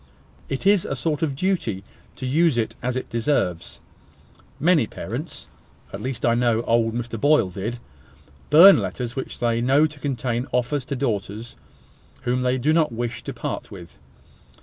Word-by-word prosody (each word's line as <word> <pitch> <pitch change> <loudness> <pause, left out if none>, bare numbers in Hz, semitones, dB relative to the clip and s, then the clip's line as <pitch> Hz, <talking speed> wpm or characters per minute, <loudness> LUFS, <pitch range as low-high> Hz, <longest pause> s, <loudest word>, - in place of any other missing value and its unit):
It 135 +6 -4
is 200 -2 +4
a 135 - -3
sort 150 +3 -1
of 150 -4 0
duty 135 - -1 0.3
to 130 - -6
use 150 +1 +2
it 115 - -1
as 125 +1 -2
it 130 - -3
deserves. 115 - -1 0.8
Many 160 -7 +3
parents - - -6 0.5
(at - - -6
least 130 -1 -3
I 115 - +4
know 120 -1 +1
old 115 -1 +1
Mr 120 -2 -4
Boyle 145 -10 +3
did) 105 +6 -4 0.7
burn 180 +6 +9
letters 120 0 -4
which 130 - -5
they 115 -1 0
know 135 +5 +4
to 150 -2 -6
contain 125 -2 -2
offers 125 +3 0
to 140 - -3
daughters 110 -3 -3 0.7
whom 125 0 0
they 125 +1 +1
do 145 +5 +1
not 160 -4 +2
wish 120 0 -4
to - - -4
part - - -5
with. - - -12
125 Hz, 165 wpm, -23 LUFS, 115-145 Hz, 0.8 s, burn